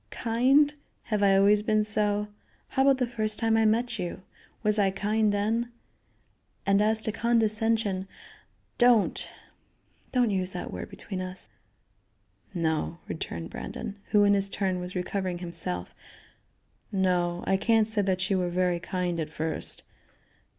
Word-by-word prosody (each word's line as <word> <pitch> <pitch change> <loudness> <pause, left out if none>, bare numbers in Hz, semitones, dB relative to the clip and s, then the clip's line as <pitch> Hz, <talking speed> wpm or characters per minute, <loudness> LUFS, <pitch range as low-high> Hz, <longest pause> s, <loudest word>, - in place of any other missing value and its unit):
Kind? 265 +6 +3 0.3
Have 210 -2 -1
I 195 -1 +5
always 205 +1 +5
been 215 0 +2
so? 210 -1 +1 0.4
How 265 - 0
about 270 0 +5
the 255 - +1
first 215 -3 -1
time 225 -1 +2
I 225 0 +3
met 230 +1 +1
you? 180 +1 -5 0.4
Was 210 0 +3
I 195 -1 +4
kind 210 +2 +1
then? 225 +4 0 0.9
And 200 0 +3
as 220 +1 +1
to 220 - +1
condescension, 225 -3 +1 0.7
don't 240 -4 +3 0.8
don't 245 -4 +2
use 185 -1 0
that 180 - -5
word - - -6
between 190 -3 -6
us." 185 0 -4 1.0
"No," 165 -2 -1
returned 85 - -5
Brandon, 200 - -6
who, 210 -1 +3
in 205 0 +5
his 200 0 +2
turn, 190 -2 -1
was 180 +1 -7
recovering 185 0 -2
himself, 170 - -3 1.0
"no, 180 -2 0
I 195 - +2
can't 220 +2 +3
say 220 -2 +2
that 190 -1 0
you 190 -1 +1
were 180 -1 0
very 180 0 +1
kind 180 -1 -2
at 155 -1 -3
first. 160 +1 -3
205 Hz, 145 wpm, -27 LUFS, 185-220 Hz, 1.0 s, I